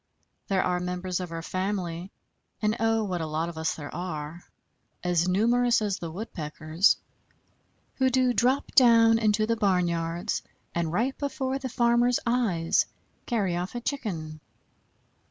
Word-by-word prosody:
There 190 -2 +2
are 180 -1 0
members 180 0 -3
of 180 -2 -5
our 165 0 -5
family, 185 -1 -3 0.5
and 215 0 +1
oh, 225 0 +2
what 180 -4 -2
a 160 - -2
lot 160 +2 -2
of 170 - -9
us 160 - -1
there 145 -2 -8
are 165 -1 -5 0.6
as 175 -1 +2
numerous 235 +6 +3
as 205 -3 -1
the 170 - -5
Woodpeckers 160 -1 0 1.0
who 260 -1 +3
do 255 -1 +2
drop 255 +4 +1
down 230 -2 +6
into 215 -1 +2
the 230 +1 +1
barnyards 175 -2 0 0.3
and 170 -2 -1
right 240 +9 0
before 270 -1 -2
the 260 -1 -4
farmer's 240 0 +3
eyes 220 -9 +2 0.4
carry 200 -8 0
off 180 +6 -4
a - - -1
Chicken. 175 - -4
190 Hz, 145 wpm, -27 LUFS, 170-235 Hz, 1.0 s, down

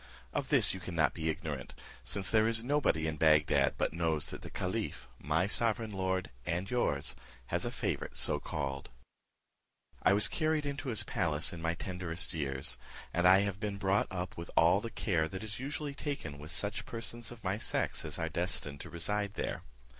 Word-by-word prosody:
Of - - -1
this - - +5
you 95 - -5
cannot 85 -5 +1
be 80 -1 -1
ignorant, 75 -5 -4 0.3
since 100 -2 0
there 110 0 +5
is 115 0 +1
nobody 130 - +2
in 80 -1 -1
Bagdad 75 -3 +4
but - - 0
knows 80 -3 0
that - - -6
the - - -7
caliph, - - -3
my 80 +6 +2
sovereign 110 +1 +1
lord 95 -1 -1
and 90 +5 -1
yours, 70 - +1 0.4
has - - +1
a - - 0
favourite - - -2
so - - +2
called. 70 -2 -3 1.1
"I - - +5
was 105 +1 +5
carried 155 +1 +1
into 140 -1 -3
his 110 - 0
palace 80 -4 0
in 85 - -6
my 85 0 0
tenderest 90 -1 -3
years, 70 -4 -2 0.3
and 85 +1 +4
I 95 +1 +8
have 100 -1 -1
been 105 -2 -2
brought 100 +1 +2
up 90 -1 -4
with 85 0 -6
all 85 +4 +6
the 115 - -4
care 85 -7 +1
that 95 +2 -5
is 110 0 -2
usually 145 +2 -3
taken 140 - -4
with 75 +1 -8
such 100 +4 -2
persons 115 0 -6
of 120 -2 -11
my 95 +2 0
sex - - -1
as 75 +1 -4
are 80 -2 -1
destined 80 -4 -2
to - - -8
reside 100 +4 -2
there. - - -2
95 Hz, 190 wpm, -33 LUFS, 80-105 Hz, 1.1 s, I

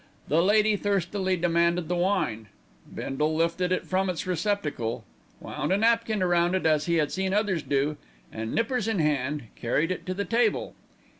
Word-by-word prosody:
The 155 +4 +4
lady 210 +3 +4
thirstily 190 -1 0
demanded 170 0 +1
the 180 - -1
wine. 175 - 0 0.4
Bindle 150 +4 -2
lifted 170 +2 0
it 185 - 0
from 190 0 0
its 180 +3 -3
receptacle, 155 - -2 0.3
wound - - -4
a 190 - +4
napkin 225 -2 +2
round 175 0 +2
it 190 - -1
as 155 -1 +2
he 170 - +2
had 155 -3 +1
seen 190 +1 -1
others 205 -5 +1
do 145 +2 0 0.3
and, 110 0 -5
nippers 230 -1 0
in 225 -2 0
hand, 150 -2 0
carried 150 +8 0
it 185 - -5
to 185 - -2
the 200 +1 -2
table. 230 -2 +1
180 Hz, 170 wpm, -26 LUFS, 155-200 Hz, 0.4 s, The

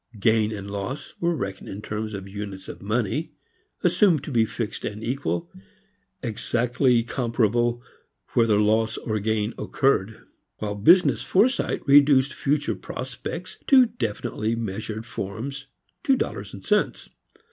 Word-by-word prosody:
Gain 110 +1 +3
and 100 -2 -6
loss 100 +8 -5
were 170 0 +1
reckoned 95 -7 -5
in 95 - -6
terms 105 0 -4
of 100 0 -7
units 100 -1 -7
of - - -8
money, 115 +8 -1 0.5
assumed 175 - +4
to 150 - -6
be 115 -3 +3
fixed 115 -1 -4
and 105 +1 -5
equal, 140 +7 -2 0.7
exactly 120 +1 +1
comparable 120 0 0 0.5
whether 115 -3 +4
loss 110 +1 +2
or 110 -2 -2
gain 110 +1 0
occurred, 110 -6 +1 0.4
while 105 -1 -3
business 170 - +5
foresight 235 +8 +1
reduced 140 -1 +6
future 140 -4 0
prospects 130 - -6
to 260 -2 +7
definitely 115 - -2
measured 110 0 -4
forms, 115 +5 -5 0.4
to 270 - +4
dollars - - -3
and - - -11
cents. - - 0
115 Hz, 130 wpm, -25 LUFS, 105-135 Hz, 0.7 s, to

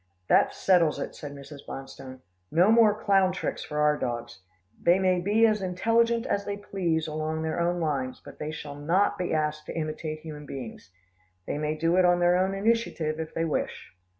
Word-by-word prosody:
"That - - +5
settles 175 -5 +3
it," - - -5
said 145 -1 -8
Mrs. 140 0 -11
Bonstone, 135 -1 -9 0.3
"no 180 +6 +4
more 220 -2 +5
clown 195 -3 +3
tricks 185 - -4
for 150 - -6
our 150 0 +3
dogs. 120 -1 -4 0.4
They 175 +2 +4
may 185 -1 +2
be 210 +5 +3
as 215 -2 +2
intelligent 230 +6 +1
as 200 -5 -1
they 200 0 -4
please 175 -6 -1
along 155 +1 -3
their 160 +1 -2
own 175 +1 +1
lines, 135 -6 -2
but - - -14
they 150 - -4
shall 150 -2 -7
not 165 +8 +1
be 180 - -2
asked 150 -1 -1
to - - -6
imitate 155 0 -4
human 150 -2 -9
beings. 120 -8 -8 0.6
They 145 - -3
may 155 0 -1
do 165 +3 +1
it 185 - +5
on 175 0 +4
their 175 0 +4
own 190 +2 +1
initiative, 195 -7 0
if 160 -1 -6
they 165 - 0
wish." 160 - -3
165 Hz, 195 wpm, -27 LUFS, 150-190 Hz, 0.6 s, That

